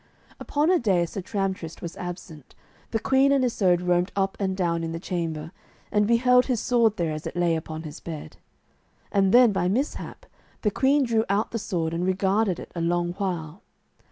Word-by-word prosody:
Upon 300 +4 +1
a 365 - +4
day 190 -7 +2
as 170 - -5
Sir 195 - -4
Tramtrist 190 -4 -3
was 170 -1 -6
absent, 175 -5 -8 0.3
the 225 - 0
queen 270 +4 +3
and 275 -2 +3
Isoud 185 -7 +2
roamed 180 +1 +1
up 195 -1 0
and 190 -2 -1
down 170 -3 0
in 165 0 -3
the 165 - -4
chamber, 165 -3 -4 0.4
and 210 0 +2
beheld 250 +2 +4
his 250 -4 0
sword 230 -3 +2
there 165 -3 -1
as 155 0 -5
it - - -7
lay 175 -1 +2
upon 160 0 -5
his 155 -1 -8
bed. 160 -3 -8 0.7
And 195 -2 +3
then 245 -1 +7
by 185 -3 0
mishap 250 +10 -3 0.4
the 210 - +2
queen 275 +5 +3
drew 230 -3 +1
out 200 +2 0
the 230 - -2
sword 165 -5 -2
and 170 +1 -1
regarded 190 +1 +1
it - - -10
a 170 - -4
long 175 +1 0
while. 175 -3 -3
190 Hz, 195 wpm, -25 LUFS, 170-225 Hz, 0.7 s, then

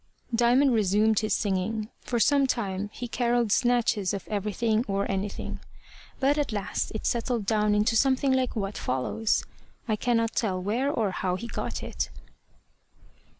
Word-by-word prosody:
Diamond 245 +3 +4
resumed 215 0 +3
his 215 - -2
singing. 210 +2 -1
For 240 - -2
some 275 +4 +4
time 205 -5 -2
he 245 - -6
carolled 240 -2 +1
snatches 230 -5 +2
of 195 - -7
everything 215 +2 0
or 200 0 0
anything; 195 +1 -3 0.6
but 280 +2 +2
at 290 - -1
last 205 -2 -2
it 220 - -4
settled 235 -2 0
down 210 0 +2
into 210 +2 +2
something 265 +2 +3
like 260 -1 0
what 200 -2 -3
follows. 130 - 0 0.4
I 215 - +1
cannot 230 0 0
tell 190 -5 0
where 225 +9 0
or 220 -8 0
how 180 0 -1
he 215 - -6
got 235 - -4
it. - - -3
220 Hz, 150 wpm, -27 LUFS, 205-240 Hz, 0.6 s, Diamond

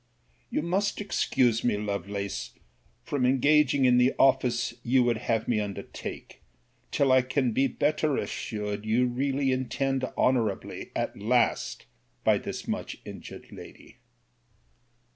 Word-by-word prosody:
You - - -1
must 195 +4 0
excuse 125 - +1
me, 120 -4 +2
Lovelace, 100 -1 -4 0.5
from 140 -3 -2
engaging 135 +1 +4
in 125 -1 +5
the 125 +2 +3
office 125 -3 +3
you 125 +1 +3
would 120 -2 +1
have 115 0 -1
me 115 -3 +2
undertake, 100 -2 -6 0.5
till 140 -2 +2
I 130 0 +6
can 130 0 0
be 135 +5 +2
better 150 +2 0
assured 105 -2 -4
you 115 +3 +2
really 135 +2 0
intend 130 +1 -1
honourably 115 -6 0
at - - -2
last 120 +4 +1 0.4
by - - +4
this - - -6
much - - -3
injured - - -10
lady. - - -12
125 Hz, 125 wpm, -27 LUFS, 110-135 Hz, 0.5 s, I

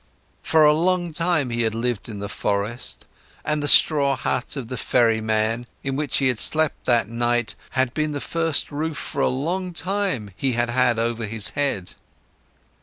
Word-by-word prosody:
For 160 -1 +4
a 150 - +6
long 175 +1 0
time, 165 -6 +1
he 120 0 -1
had 110 -1 -1
lived 120 -2 -2
in 105 - -7
the 100 0 -5
forests, 105 +4 -2 0.4
and 150 -1 0
the 145 - -2
straw 140 -2 +6
hut 130 0 -2
of 130 -4 -5
the 125 - -5
ferryman, 110 -1 +1 0.2
in 135 -1 -2
which 145 0 -1
he 135 - +2
had 125 -3 -1
slept 155 -1 +1
that 120 -4 +2
night, 120 -1 0 0.2
had 130 -1 +1
been 155 -1 -1
the 145 - -3
first 165 0 -1
roof 155 +1 -3
for - - -4
a - - +3
long 175 +8 -2
time 180 - -2
he 130 +4 -1
had 120 0 0
had 125 -1 +2
over 115 -1 -2
his 105 -1 +1
head. 140 -11 -2
130 Hz, 180 wpm, -22 LUFS, 115-150 Hz, 0.4 s, a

